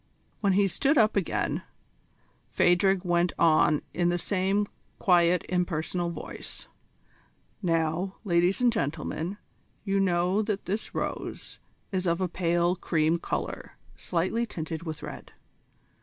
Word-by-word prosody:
When 200 Hz, -2 st, +2 dB
he 200 Hz, +1 st, +4 dB
stood 275 Hz, -, +2 dB
up 215 Hz, -3 st, +4 dB
again 195 Hz, -5 st, 0 dB, 0.9 s
Phadrig 185 Hz, +1 st, +3 dB
went 175 Hz, 0 st, +2 dB
on 155 Hz, -2 st, +4 dB
in 175 Hz, 0 st, +2 dB
the 175 Hz, -, +1 dB
same 195 Hz, +3 st, +1 dB, 0.3 s
quiet 175 Hz, -1 st, +3 dB
impersonal 175 Hz, -1 st, -1 dB
voice: 170 Hz, -, -7 dB, 0.9 s
"Now, 165 Hz, +1 st, 0 dB
ladies 175 Hz, +1 st, +2 dB
and 245 Hz, -2 st, +4 dB
gentlemen, 165 Hz, +2 st, -2 dB, 0.5 s
you 195 Hz, -1 st, +1 dB
know 180 Hz, +1 st, +2 dB
that 205 Hz, -2 st, -2 dB
this 205 Hz, +4 st, -3 dB
rose -, -, -4 dB, 0.3 s
is 185 Hz, -1 st, -1 dB
of 170 Hz, +1 st, +1 dB
a 185 Hz, -, +1 dB
pale 175 Hz, 0 st, +1 dB
cream 165 Hz, -1 st, +1 dB
colour -, -, -4 dB, 0.2 s
slightly 185 Hz, +7 st, -1 dB
tinted 160 Hz, -4 st, -5 dB
with 155 Hz, -1 st, -5 dB
red. -, -, -8 dB
180 Hz, 125 wpm, -28 LUFS, 170-195 Hz, 0.9 s, he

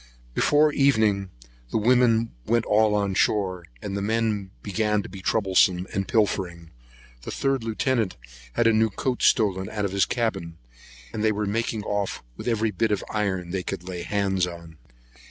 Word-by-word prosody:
Before 150 Hz, -, +3 dB
evening, 110 Hz, -9 st, +2 dB, 0.4 s
the -, -, 0 dB
women 115 Hz, 0 st, +3 dB, 0.2 s
went 115 Hz, 0 st, +2 dB
all 105 Hz, 0 st, +3 dB
on 100 Hz, -2 st, 0 dB
shore, 95 Hz, -3 st, +1 dB, 0.2 s
and 100 Hz, -, -4 dB
the 100 Hz, -, -2 dB
men 110 Hz, -2 st, 0 dB
began 105 Hz, 0 st, 0 dB
to -, -, -9 dB
be 95 Hz, -, -9 dB
troublesome 95 Hz, -3 st, +2 dB
and 95 Hz, -, -1 dB
pilfering. 95 Hz, -8 st, 0 dB, 0.5 s
The -, -, -8 dB
third 135 Hz, -3 st, 0 dB
lieutenant 115 Hz, -1 st, 0 dB, 0.4 s
had 115 Hz, -, +1 dB
a 115 Hz, -, +5 dB
new 110 Hz, +1 st, +3 dB
coat 125 Hz, +5 st, -2 dB
stole 100 Hz, -4 st, +3 dB
out 105 Hz, -1 st, -2 dB
of 100 Hz, -, -2 dB
his 100 Hz, 0 st, +2 dB
cabin; 95 Hz, -9 st, -2 dB, 0.6 s
and 105 Hz, -, -3 dB
they 110 Hz, -, +4 dB
were 105 Hz, 0 st, -1 dB
making 110 Hz, +1 st, -1 dB
off 100 Hz, -1 st, -2 dB
with -, -, -8 dB
every 110 Hz, -2 st, +1 dB
bit 110 Hz, +3 st, 0 dB
of 105 Hz, -, 0 dB
iron 95 Hz, -5 st, -1 dB
they 95 Hz, 0 st, -1 dB
could 90 Hz, -, -5 dB
lay 90 Hz, -2 st, -5 dB
hands 95 Hz, -2 st, 0 dB
on. 85 Hz, -2 st, -10 dB
105 Hz, 175 wpm, -25 LUFS, 95-115 Hz, 0.6 s, a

